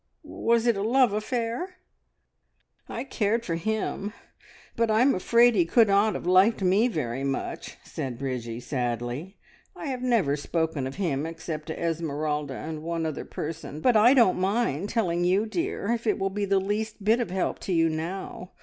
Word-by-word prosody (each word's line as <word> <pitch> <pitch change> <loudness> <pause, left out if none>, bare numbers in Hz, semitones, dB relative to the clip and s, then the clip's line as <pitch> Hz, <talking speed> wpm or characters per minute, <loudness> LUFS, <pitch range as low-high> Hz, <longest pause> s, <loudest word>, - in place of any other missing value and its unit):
Was 235 0 0
it 235 -2 +3
a 195 - -2
love 245 +1 +3
affair?" 235 - -2 1.1
"I 235 - -4
cared 230 -3 -1
for 170 - -2
him, 205 +3 -2 0.6
but 230 -1 +1
I 220 +1 +3
am 275 - +4
afraid 235 +6 +4
he 185 -5 +4
could 220 +6 +4
not 200 +2 +3
have - - -5
liked 190 +4 +4
me 195 +6 +4
very 135 - -3
much," 135 -1 -4
said 130 -3 -5
Bridgie 125 -3 -4
sadly. 125 - -3 0.4
"I - - -7
have 255 -2 -3
never 230 - +2
spoken 155 -1 -2
of 135 - -7
him 160 -6 -1
except 160 -1 -6
to 160 - -5
Esmeralda 150 -4 -2
and 155 +2 -6
one 165 0 -2
other 155 -2 -4
person, 155 -1 -6
but 245 +8 +3
I 235 +5 +6
don't 230 -8 +4
mind 195 - 0
telling 175 -7 0
you, 190 +4 +2
dear, 235 - -2
if 235 -1 -2
it - - +2
will 195 -1 -1
be 205 +1 -1
the 195 0 +2
least 210 +2 -3
bit 220 +4 +3
of 240 - -2
help 185 +1 -1
to - - -5
you 165 -2 +3
now. 175 +3 -5
190 Hz, 180 wpm, -26 LUFS, 155-225 Hz, 1.1 s, I